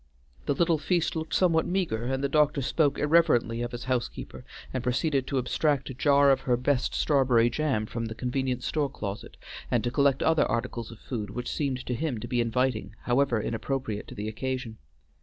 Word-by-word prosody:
The - - +2
little 165 0 +2
feast 170 +1 0
looked 160 0 -3
somewhat 165 -3 +3
meagre, 175 - -1
and 135 +2 -1
the - - +3
doctor 150 -1 +2
spoke 145 +2 +1
irreverently 145 -7 +3
of 120 0 -3
his 120 0 -6
housekeeper 130 -2 -3 0.3
and 130 -2 -2
proceeded 130 +2 0
to 140 - -1
abstract 140 +2 0
a - - -6
jar 140 +1 +4
of 135 - +3
her 125 -2 +1
best 125 +1 0
strawberry 125 -5 +3
jam 135 -7 0
from 115 +1 -4
the 110 0 -6
convenient 125 0 -2
store 150 -3 0
closet, 105 -6 -6 0.3
and 120 - +1
to 120 - -1
collect 140 +1 +2
other 160 -1 +3
articles 120 -1 -3
of 115 - -11
food 110 -3 -5
which 125 +4 -4
seemed 135 -4 -2
to 125 - -2
him 130 -2 -2
to - - -6
be 120 -1 +1
inviting, 120 -1 -1
however 125 -1 +2
inappropriate 115 0 -3
to - - -10
the 105 +1 -4
occasion. 125 - -4
130 Hz, 195 wpm, -27 LUFS, 120-145 Hz, 0.3 s, jar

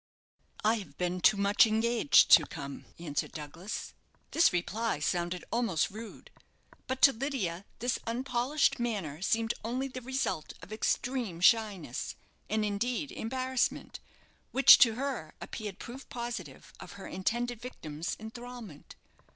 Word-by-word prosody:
"I 220 +2 +3
have 195 - -11
been 180 0 -1
too 215 - +5
much 200 +3 +5
engaged 230 +4 +4
to 155 - +8
come," 140 0 -7
answered 155 -4 -3
Douglas. 160 +6 -6 0.4
This 330 - +5
reply 205 +4 -1
sounded 175 +4 -1
almost 230 -10 +1
rude; 220 +2 -10 0.6
but 260 0 -3
to 275 - +9
Lydia 220 - -3
this 245 +2 -1
unpolished 250 +4 +1
manner 195 -11 -3
seemed 225 +4 +1
only 250 +4 -2
the 255 -1 -7
result 260 - -2
of 210 - -9
extreme 230 -4 -1
shyness, 200 - +2 0.3
and, 215 0 +1
indeed, 240 +7 -1
embarrassment, 255 +2 -2 0.5
which 270 0 +9
to 225 -3 +6
her 255 - -4
appeared 205 -3 -6
proof 255 +5 -9
positive 240 0 -6
of - - -10
her - - -10
intended 235 +5 -2
victim's 160 -10 -5
enthralment. 225 -6 -9
225 Hz, 130 wpm, -31 LUFS, 180-245 Hz, 0.6 s, to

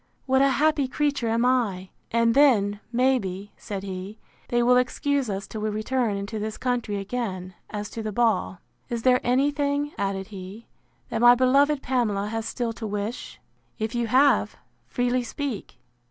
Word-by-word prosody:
What 265 0 +3
a 275 - +5
happy 290 0 +2
creature 280 -3 0
am 230 +2 +1
I!—And 230 -1 0
then, 215 -8 +4
may 255 +2 +3
be, 195 0 -6
said 195 -2 -6
he, 190 +2 -6 0.3
they 240 0 +1
will 250 +1 +5
excuse 275 +1 0
us 195 0 -3
till 215 - -7
we 215 - 0
return 215 0 -1
into 200 +2 -4
this 215 +1 -4
country 240 -5 -1
again, 195 -3 -4 0.2
as 210 -1 -4
to 225 - -5
the 215 -1 -3
ball. 210 -5 0 0.3
Is 235 -2 -3
there 255 -1 +4
any 265 +4 +2
thing, 285 0 -1
added 195 0 -2
he, 195 +2 -9 0.4
that - - -2
my 240 0 +8
beloved 275 +3 +3
Pamela 215 -6 0
has 225 0 -3
still 235 -1 -2
to 225 -1 -6
wish? 210 +3 -5 0.4
If 220 +1 -3
you 240 -1 -1
have, 270 +5 +3 0.3
freely 245 +1 0
speak. 245 - -5
235 Hz, 170 wpm, -25 LUFS, 205-255 Hz, 0.4 s, my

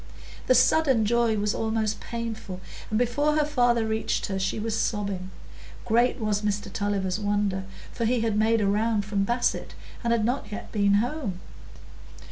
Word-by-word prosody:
The 255 - +5
sudden 255 -2 +4
joy 235 0 +2
was 205 0 0
almost 220 -1 -1
painful, 225 -5 -5 0.3
and 215 - 0
before 270 +6 +1
her 305 -1 +3
father 245 -5 +2
reached 220 0 -1
her, 195 -1 -3
she 190 +3 -1
was 220 0 -2
sobbing. 200 -4 -2 0.6
Great 240 +2 +3
was 210 -2 0
Mr 205 -1 -2
Tulliver's 200 -2 -1
wonder, 205 -2 0 0.3
for 230 - -2
he 240 +1 +2
had 225 -2 0
made 220 +1 +3
a 200 - +2
round 210 +1 +1
from 200 -1 0
Basset, 240 +3 -1 0.3
and 235 - +1
had 230 -2 +2
not 240 -3 -2
yet 210 - -7
been 200 -2 +3
home. 230 - -1
220 Hz, 165 wpm, -26 LUFS, 205-235 Hz, 0.6 s, The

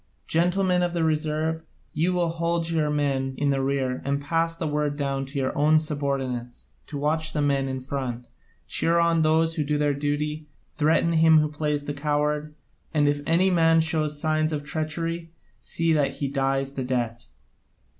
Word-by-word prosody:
Gentlemen 180 +2 +2
of 175 -1 0
the 170 - +1
reserve, 155 +1 0 0.3
you 165 +4 +1
will 175 -2 +1
hold 170 0 -1
your 155 -2 +1
men 135 -3 0
in 145 -1 +1
the 135 -1 0
rear, 135 -2 -1
and 140 +1 -1
pass 165 +3 0
the 165 - -4
word 150 -1 -1
down 135 -1 -2
to 140 +2 -7
your 130 -1 -1
own 155 +2 +4
subordinates 135 - -3 0.2
to 145 - -6
watch 155 +2 0
the 150 - -1
men 140 -1 +1
in 130 0 -3
front, 130 -3 -4 0.4
cheer 170 +1 +1
on 170 -1 +3
those 160 +1 +3
who 155 - -1
do 150 +1 0
their 145 -1 +1
duty, 150 +2 -2 0.3
threaten 160 +2 +2
him 160 0 +6
who 150 -1 +2
plays 150 -1 -2
the 145 - -3
coward, 150 +1 -1 0.4
and 145 -1 +3
if 145 0 +1
any 180 +4 +3
man 165 -2 +4
show 160 -1 +1
signs 155 +1 0
of 150 -2 -3
treachery, 165 +2 -3 0.3
see 165 -1 0
that 145 -3 +1
he 140 - -2
dies 135 0 0
the 135 -1 -4
death. 120 -2 -3
150 Hz, 180 wpm, -25 LUFS, 140-160 Hz, 0.4 s, him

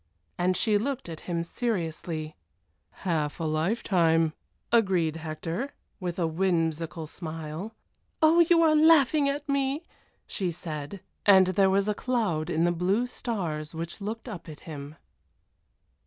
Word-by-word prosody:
And 180 +1 +1
she 210 -2 +2
looked 260 -3 -3
at 160 -1 -6
him 170 -1 0
seriously. 165 -6 -3 0.7
"Half 155 -4 0
a - - -2
lifetime!" 165 -1 +2 0.4
agreed 185 -9 +3
Hector, 165 - -4 0.2
with 180 -3 -3
a 175 - +1
whimsical 165 -2 0
smile. 160 +5 -6 0.4
"Oh! 320 +2 +5
you 335 0 +5
are 310 -1 +5
laughing 305 -2 +5
at 285 +1 -3
me!" 280 +2 0 0.4
she 185 -3 -2
said, 160 +1 -6 0.2
and 190 -2 +7
there 195 +1 +4
was 195 +1 +2
a 210 - +2
cloud 205 -10 -1
in 165 -1 +1
the 175 - +3
blue 185 +7 +1
stars 170 -12 -4
which 165 +5 -5
looked 220 +4 -5
up 185 -8 -7
at 150 - -10
him. 145 -2 -8
180 Hz, 140 wpm, -27 LUFS, 160-230 Hz, 0.7 s, and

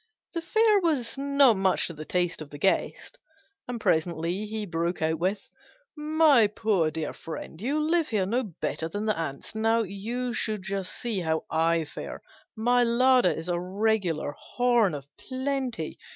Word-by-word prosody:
The 335 - -2
fare 435 +4 +3
was 295 -10 0
not 280 -4 +4
much 190 -1 +2
to 170 - -4
the 155 0 -8
taste 175 -1 0
of 150 - -8
the 145 - -9
guest, 190 +6 -1 0.5
and 245 -1 -4
presently 170 +3 0
he 215 0 -4
broke 170 0 -2
out 160 0 0
with 190 +4 -1 0.5
"My 300 -6 +4
poor 205 -6 +1
dear 155 -1 -4
friend, 160 +1 -8
you 275 +7 0
live 320 +1 +2
here 210 -4 0
no 235 +7 0
better 165 -5 -4
than 205 +5 -3
the 215 - +1
ants. 155 -4 -5
Now, 225 +1 +2
you 230 +6 -4
should 215 -4 -2
just 195 -1 -3
see 230 -5 -3
how 160 -2 -1
I 165 0 +2
fare! - - -8 0.3
My 245 +2 +3
larder 250 +2 +4
is 160 +2 -3
a 175 -1 0
regular 185 -4 0
horn 240 -8 +1
of 140 -2 -7
plenty. 260 - -3
210 Hz, 165 wpm, -27 LUFS, 170-245 Hz, 0.5 s, not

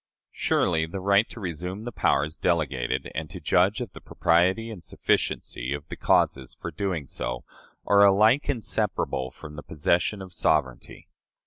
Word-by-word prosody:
Surely 80 -3 +1
the 95 +4 -5
right 100 +3 +3
to - - -10
resume 90 +2 -5
the 120 - -5
powers 75 -6 +1
delegated 75 -7 -1
and 80 0 -4
to - - -8
judge 95 +6 +2
of 120 -6 -5
the - - -11
propriety 95 +7 +1
and 100 -6 -9
sufficiency 65 +3 -1
of 75 +1 -9
the - - -5
causes 65 -2 +1
for - - -6
doing 95 -7 -2
so - - -5 0.4
are 100 0 +5
alike 110 +9 +4
inseparable 105 - -1
from 75 +3 -11
the 75 - -7
possession 85 +7 0
of 95 -2 -9
sovereignty. 65 -8 -1
90 Hz, 155 wpm, -26 LUFS, 75-100 Hz, 0.4 s, are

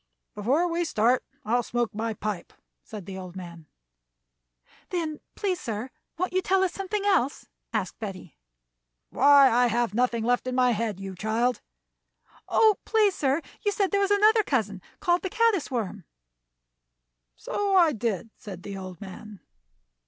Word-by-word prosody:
"Before 265 - +1
we 340 0 0
start 245 -5 +2 0.2
on 220 - -1
I'll 245 - +4
smoke 240 0 -2
my 220 +1 -2
pipe," 210 -4 -5 0.3
said 210 -5 -9
the 190 0 -7
old 185 -1 -9
man. 170 -4 -9 1.2
"Then, 320 -4 -3 0.2
please, 380 -4 -1
sir, 230 +2 -4 0.3
won't 365 +2 -2
you 370 - +2
tell 380 +1 +2
us 370 - 0
something 395 +1 -3
else?" 360 -10 +1 0.3
asked - - -3
Betty. 190 -6 -7 0.8
"Why, 280 -1 +6
I 245 +2 +4
have 235 -2 0
nothing 235 -1 +1
left 245 +2 +1
in 255 - -2
my 250 -1 +4
head, 220 -3 -2
you 195 -1 -6
child." 225 +6 0 0.9
"Oh, 435 -3 +5
please, 430 -3 +3
sir, 285 +1 0 0.2
you 410 - +2
said 395 -1 0
there 400 -1 +2
was 395 - +2
another 425 +2 +5
cousin 215 - -1 0.2
called 355 -3 +2
the 380 - -3
caddis 445 -5 +2
worm." 210 -7 -3 1.3
"So 400 - -1
I 340 -4 +6
did," 225 -2 -2
said 185 -4 -9
the 200 -1 -6
old 185 -3 -8
man. 200 +1 -10
245 Hz, 160 wpm, -26 LUFS, -, 1.3 s, Why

